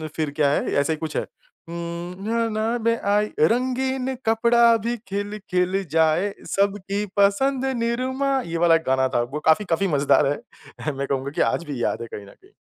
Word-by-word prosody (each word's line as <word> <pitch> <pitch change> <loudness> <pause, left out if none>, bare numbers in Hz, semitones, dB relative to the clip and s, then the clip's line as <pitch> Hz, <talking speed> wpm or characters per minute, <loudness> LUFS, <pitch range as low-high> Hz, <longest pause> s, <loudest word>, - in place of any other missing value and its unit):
फिर 155 -2 -1
क्या 145 -2 +3
है, - - 0
ऐसा 140 +3 +2
ही - - -4
कुछ 155 -1 -4
है। - - -1 0.4
हुँ 170 +2 -6
ना 230 0 +1
ना 220 +2 -1
में 230 0 +3 0.2
आई 210 +1 +2
रंगीन 255 +7 +1
कपड़ा 235 +1 +4
भी 240 +1 0
खिल-खिल 195 -2 -1
जाए 160 +5 +2 0.2
सबकी 200 +1 0
पसंद 255 +7 +2
निरमा 260 +4 0
ये 170 0 -3
वाला 170 -1 +5
एक 165 - 0
गाना 130 0 +3
था। 120 - +3
वो 150 - -2
काफ़ी 160 +6 +4
काफ़ी 185 +4 +1
मज़ेदार 140 0 +3
है। 150 +1 -7
मैं 140 +1 -4
कहूँगा 135 0 -2
कि - - +1
आज - - +1
भी 135 -5 -4
याद - - -1
है 115 - -5
कहीं 100 - -7
न - - -13
कहीं। - - -23
195 Hz, 190 wpm, -23 LUFS, 160-230 Hz, 0.4 s, वाला